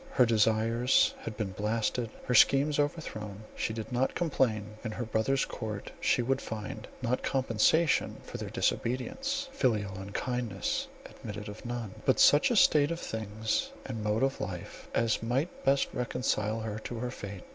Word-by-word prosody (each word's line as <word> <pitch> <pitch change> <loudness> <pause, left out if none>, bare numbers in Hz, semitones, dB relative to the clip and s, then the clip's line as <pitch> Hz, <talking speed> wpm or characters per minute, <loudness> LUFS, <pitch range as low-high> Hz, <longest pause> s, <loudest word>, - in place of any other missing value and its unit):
Her 125 - +5
desires 115 +2 +3
had 110 -2 -7
been 105 -4 -2
blasted, 110 +4 -1 0.2
her 125 - 0
schemes 140 +5 +5
overthrown. 110 - -3
She - - -1
did 110 +2 -5
not 125 +2 +1
complain; 110 - 0
in 110 -2 -3
her 120 - -3
brother's 110 +5 +1
court 105 -3 -5
she 120 - +3
would 135 +2 0
find, 110 0 -6 0.2
not 125 +1 0
compensation 135 +5 +2
for - - -7
their - - -5
disobedience 270 - -1
(filial 110 - 0
unkindness 110 +1 -2 0.2
admitted 105 0 -8
of 105 +4 -8
none), 120 -5 -4
but - - +3
such - - +6
a - - +1
state 145 -1 +5
of 170 0 -3
things 110 - -2 0.2
and 115 -5 -4
mode 105 +3 +1
of 135 0 0
life, 90 -2 -6
as 115 -2 +2
might 130 +9 -1
best 135 0 +3
reconcile 115 -3 -1
her 110 -1 -4
to 120 +2 -6
her 125 +1 -3
fate. 100 -6 -7
115 Hz, 160 wpm, -30 LUFS, 110-130 Hz, 0.2 s, such